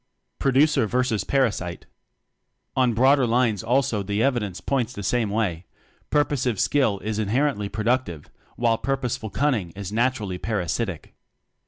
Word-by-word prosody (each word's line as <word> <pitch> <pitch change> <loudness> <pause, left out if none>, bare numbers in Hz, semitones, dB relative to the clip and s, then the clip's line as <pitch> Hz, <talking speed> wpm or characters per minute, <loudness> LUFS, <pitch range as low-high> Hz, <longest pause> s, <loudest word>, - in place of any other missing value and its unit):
Producer 135 -2 +3
Versus 125 -4 0
Parasite. 100 -8 -1 0.9
On 125 -3 +2
broader 130 +2 +4
lines 115 -3 +2
also 120 -2 +1
the 100 +3 -1
evidence 115 -9 0
points 125 -3 -1
the 100 - -7
same 115 +2 +1
way: 95 -5 -2 0.4
purposive 130 -7 +1
skill 130 -9 +2
is 110 0 -2
inherently 110 0 0
productive, 110 - -1 0.2
while 115 -1 +1
purpose 135 -3 -1
ful 110 -3 -7
cunning 120 -8 0
is 100 -1 -6
naturally 110 -5 0
parasitic. 100 -3 -3
115 Hz, 130 wpm, -24 LUFS, 100-130 Hz, 0.9 s, broader